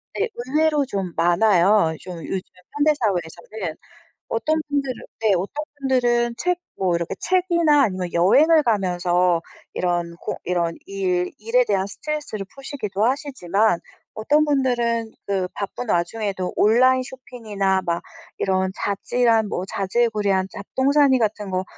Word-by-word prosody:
네 430 +3 0
의외로 295 +4 +1
좀 195 -8 -3
많아요 175 0 +4
좀 180 -1 -8
요즘 190 - -2 0.4
현대사회에서는. 200 - -1 0.5
어떤 310 +8 0
분들으 280 -2 -1 0.3
네, 220 -2 +3
어떤 200 - -3
분들은 240 -3 +1
책 360 0 0 0.2
뭐 185 -2 +1
이렇게 170 0 -2
책이나 340 -5 +3
아니면 185 -3 -3
여행을 300 - +5
가면서 180 - +1 0.3
이런 175 -1 -1
고 - - -4
이런 170 -2 0
일 185 -2 -1
일에 230 +4 +2
대한 195 -4 0
스트레스를 285 -2 -4
푸시기도 260 -8 -4
하시지만 220 - 0 0.3
어떤 295 +8 +2
분들은 240 -5 0 0.2
그 190 -2 -1
바쁜 205 +4 -5
와중에도 190 +1 -1
온라인 255 +4 +4
쇼핑이나 225 -7 -2
막 170 0 -1 0.3
이런 190 0 0
자질한 225 +2 +1
뭐 180 - -3
자질구레한 200 -2 0
잡동사니 265 +6 +2
같은 210 -3 -1
거 185 0 -1
215 Hz, 295 characters per minute, -22 LUFS, 185-260 Hz, 0.5 s, 여행을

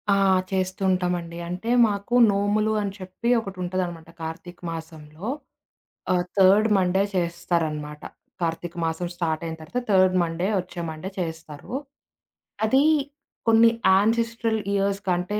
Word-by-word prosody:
ఆ! - - +2 0.3
చేస్తుంటామండి. 185 -2 -1
అంటే 180 +6 -4 0.2
మాకు 205 +3 -3 0.2
నోములు 205 +2 +1
అని 200 -1 -2
చెప్పి 185 +5 -4
ఒకటుంటదనమాట 180 -4 -4
కార్తీక 165 +2 -7
మాసంలో. 160 0 -8 0.9
ఆహ్, 175 -1 +1
థర్డ్ 195 +3 +6
మండే 190 +1 +2
చేస్తారనమాట. 170 -4 -1 0.4
కార్తీక 170 +1 -2
మాసం 165 +2 -2
స్టార్టయిన 165 -1 -2
తర్వాత 155 +11 -3
థర్డ్ 185 -1 +5
మండే 170 +2 -2
వచ్చే 180 -1 -6
మండే 155 +4 -6
చేస్తారు. 160 0 -6 0.9
అదీ 265 +6 +4 0.7
కొన్ని 225 +1 +7 0.3
యాన్సెస్టరల్ 230 +2 +1
ఇయర్స్ 200 0 0
కంటే 180 +4 0
180 Hz, 110 wpm, -24 LUFS, 165-200 Hz, 0.9 s, కొన్ని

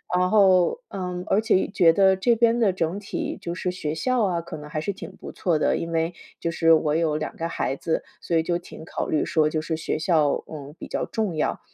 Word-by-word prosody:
然 180 0 +2
后， 195 - +4
嗯， 180 -2 -4
而 205 - +3
且 220 -4 +2
觉 180 -5 +4
得 190 +2 +4
这 235 +5 +2
边 235 +1 +3
的 210 -5 +4
整 180 +2 -2
体 205 - -4
就 170 0 -4
是 180 0 -2
学 155 -4 -4
校 250 +5 +1
啊， 180 -4 +1
可 170 0 -7
能 150 -1 -9
还 155 - -3
是 195 +6 -2
挺 195 - -9
不 - - -9
错 170 -4 0
的， - - +1
因 165 0 -4
为 165 +1 0 0.3
就 165 - -2
是 165 0 +4
我 155 -1 +2
有 160 -2 +1
2 155 - -4
个 165 0 -3
孩 135 - -2
子， 160 +3 -2 0.2
所 170 - 0
以 160 - +2
就 175 +1 -1
挺 160 -2 -11
考 - - -3
虑 155 - +1
说 155 -1 +2
就 155 0 -1
是 160 +1 -2
学 160 - -2
校， 155 -2 +2 0.2
嗯， 145 -1 -9
比 - - -8
较 - - -2
重 210 -7 -2
要， 155 - -1
170 Hz, 255 characters per minute, -24 LUFS, 160-190 Hz, 0.3 s, 后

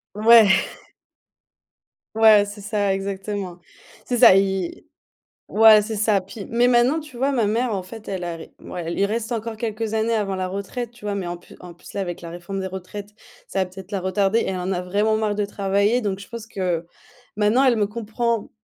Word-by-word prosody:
Ouais 225 0 +7 1.7
ouais, 215 -2 +6
c'est 205 0 -9
ça, 205 -2 0
exactement. 195 -2 -4 0.5
C'est 245 - -1
ça, 190 - +8
ils 195 -2 0 0.6
ouais, 220 -1 +7
c'est 220 +1 -4
ça. 210 -2 +2
Puis, 195 +2 -9
mais 240 +1 +3
maintenant, 250 +6 +3
tu 300 -5 -12
vois? 275 +3 +1
Ma 235 -5 +1
mère, 230 +2 0
en 185 - -3
fait, 215 +4 -11
elle 185 -2 -4
arri 165 -1 -6
mouais, 175 -2 -7
elle 170 - -3
il 200 - +3
reste 225 +2 -3
encore 225 -1 -3
quelques 220 -1 -3
années 220 +1 +1
avant 200 -3 -1
la 185 0 -2
retraite, 200 +5 -5
tu 235 -3 -14
vois? 205 - -1
Mais 190 -3 -3
en 175 0 -4
plus 175 - -17
en 175 -1 -11
plus, 175 - -15
là, 200 - -2
avec 175 -2 -5
la 170 - -8
réforme 175 +3 -6
des 190 - -3
retraites, 190 +2 -8 0.4
ça 195 - -3
va - - -6
peut-être 190 +2 -12
la 195 - -1
retarder, 195 +4 +1
elle 190 - -2
en 180 +2 -3
a 180 -1 -1
vraiment 205 +4 +1
marre 210 -2 -1
de 210 -1 0
travailler, 200 +4 +1
donc, 200 -2 -2
pense 230 -1 -7
que, 180 -5 -2 0.5
maintenant, 215 +5 +3
elle 250 -3 +4
me 210 -2 +1
comprend 230 +1 -2
205 Hz, 205 wpm, -22 LUFS, 190-225 Hz, 1.7 s, ça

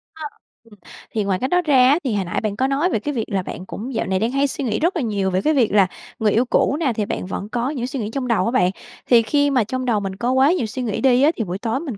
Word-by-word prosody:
Ha, 315 -1 -7 0.4
ừm, 215 -3 -19 0.3
thì 215 -2 -1
ngoài 190 -2 -1
cách 260 - -2
đó 360 0 +3
ra 265 -6 +4
á, 295 +5 +4
thì 255 -5 -1
hồi 200 -2 -1
nãy 175 - -2
bạn 210 -2 -2
có 260 +4 +1
nói 280 +6 +1
về 220 - 0
cái 290 +7 -4
việc 225 -5 -2
là 195 -3 0
bạn 185 - -7
cũng 240 +7 -7
dạo - - -1
này 190 0 0
đang 225 +3 0
hay 275 +1 +1
suy 280 - -4
nghĩ 220 -4 -1
rất 345 +5 +1
là 325 - -1
nhiều 200 -5 -1
về 185 - 0
cái 310 - +2
việc 250 -7 +2
là 195 -3 +5 0.3
người 215 -2 +2
yêu 240 +3 +2
cũ 280 - +1
nè, 275 -8 +1
thì 210 -1 -2
bạn - - -4
vẫn 195 +2 -5
có 245 +3 -1
những 290 - -4
cái 245 - -2
suy 265 0 -5
nghĩ 210 -1 -3
trong 265 -1 -3
đầu 225 -5 +1
á 230 - 0
bạn, 185 -7 +2 0.4
thì 235 -2 +6
khi 285 +5 +1
mà 255 -4 +3
trong 255 +4 -4
đầu 225 -4 +1
mình 195 -1 -5
có 240 +5 -1
quá 265 +3 +4
nhiều 350 -10 0
suy 235 +4 -5
nghĩ 225 -4 -2
đi 260 -1 +4
á, 310 - +5
thì 225 - -1
buổi 185 0 -4
tối 230 +3 -2
mình 275 -10 -6
240 Hz, 330 wpm, -21 LUFS, 210-270 Hz, 0.4 s, thì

